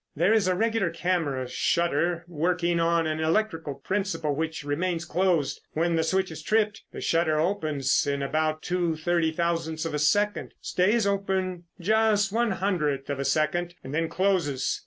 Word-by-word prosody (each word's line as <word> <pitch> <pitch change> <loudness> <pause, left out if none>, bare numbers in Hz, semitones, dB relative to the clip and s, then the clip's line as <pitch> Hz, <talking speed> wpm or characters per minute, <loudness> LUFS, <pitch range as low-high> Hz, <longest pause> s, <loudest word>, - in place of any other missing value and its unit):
There 175 +8 +3
is 215 -4 +3
a 185 - +2
regular 225 -2 +1
camera 165 -7 -1
shutter 170 +5 0
working 175 +1 0
on 165 0 +2
an 155 0 -1
electric 165 +1 0 0.2
principle 185 -7 -1
which 160 0 -3
remains 165 +4 -1
closed. 175 -5 0
When 165 +2 +1
the 165 - +2
switch 190 +2 0
is 160 - -7
tripped, 215 +4 +1
the - - -7
shutter 165 -2 +1
opens 155 -7 +1
in 140 -1 -1
about 155 +2 -1
two 175 -2 0
thirty 165 0 +1
thousandths 165 -1 -1
of 165 - -3
a 150 - -1
second, 205 +7 +1
stays 205 +5 +1
open 190 -3 -1
just 210 +1 +2
one 235 +2 +1
one 190 - -2
hundredth 150 -8 -1
of 140 - -3
a 140 - -2
second, 170 +5 0
and 130 - -7
then 165 +1 0
closes. 175 -9 0
170 Hz, 170 wpm, -26 LUFS, 155-190 Hz, 0.2 s, There